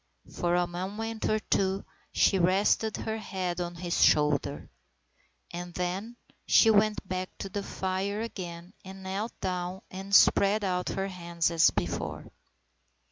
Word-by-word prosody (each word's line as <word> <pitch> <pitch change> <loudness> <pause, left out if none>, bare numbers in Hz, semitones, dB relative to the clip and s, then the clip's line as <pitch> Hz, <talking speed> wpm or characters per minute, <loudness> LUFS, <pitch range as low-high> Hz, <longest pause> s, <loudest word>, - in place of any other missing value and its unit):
For 175 0 0
a 180 0 +3
moment 205 +6 -4
or 215 - +3
two 195 -2 0 0.3
she 195 - +3
rested 195 +4 +2
her 220 0 -3
head 185 -4 -3
on 175 0 -4
his 170 0 0
shoulder. 150 -2 +2 0.8
And 175 0 -7
then 190 +7 -3 0.3
she 225 - +6
went 210 -1 +2
back 185 0 -4
to 195 - -5
the 200 +1 -3
fire 195 +2 -2
again 175 -5 -7
and 190 0 -10
knelt 195 +4 -4
down 180 0 -3
and 195 +1 -1
spread 205 +2 +5
out 180 -2 -1
her 195 0 -2
hands 170 -2 -1
as 165 -1 +5
before. 85 - -4
190 Hz, 140 wpm, -29 LUFS, 175-200 Hz, 0.8 s, she